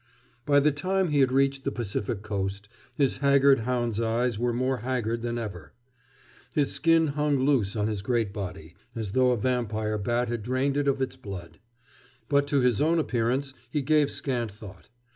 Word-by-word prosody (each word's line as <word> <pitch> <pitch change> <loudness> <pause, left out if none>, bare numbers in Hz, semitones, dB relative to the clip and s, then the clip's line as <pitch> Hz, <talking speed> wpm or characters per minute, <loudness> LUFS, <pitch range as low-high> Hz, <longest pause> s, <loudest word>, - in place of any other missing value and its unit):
By 145 -1 +5
the 150 +2 +3
time 185 +5 0
he 150 -1 +2
had 130 -2 +4
reached 135 0 +1
the 140 - -1
Pacific 105 -3 -3
coast 100 -1 -3 0.3
his 140 -3 +1
haggard 140 0 +4
hound's 120 -1 -1
eyes 115 0 0
were 120 0 +1
more 130 +2 0
haggard 115 -1 -2
than 120 0 -2
ever. 95 - -7 0.8
His 145 -3 +2
skin 165 -1 +3
hung 150 0 +1
loose 120 -8 +2
on 105 -1 0
his 105 -3 -2
great 115 -2 0
body, 90 -6 -6 0.2
as 110 -4 -3
though 130 +3 +3
a 125 - +2
vampire 110 -3 -1
bat 120 +4 0
had 120 -1 -3
drained 130 +5 0
it 145 0 0
of 135 -1 +1
its 130 - -4
blood. 95 -9 -9 0.7
But 140 0 +3
to 140 -1 +2
his 125 -2 +2
own 165 +3 +3
appearance 130 -1 0 0.2
he 145 +2 -1
gave 150 0 +3
scant 120 -5 -2
thought. 100 -2 -13
125 Hz, 180 wpm, -27 LUFS, 110-140 Hz, 0.8 s, By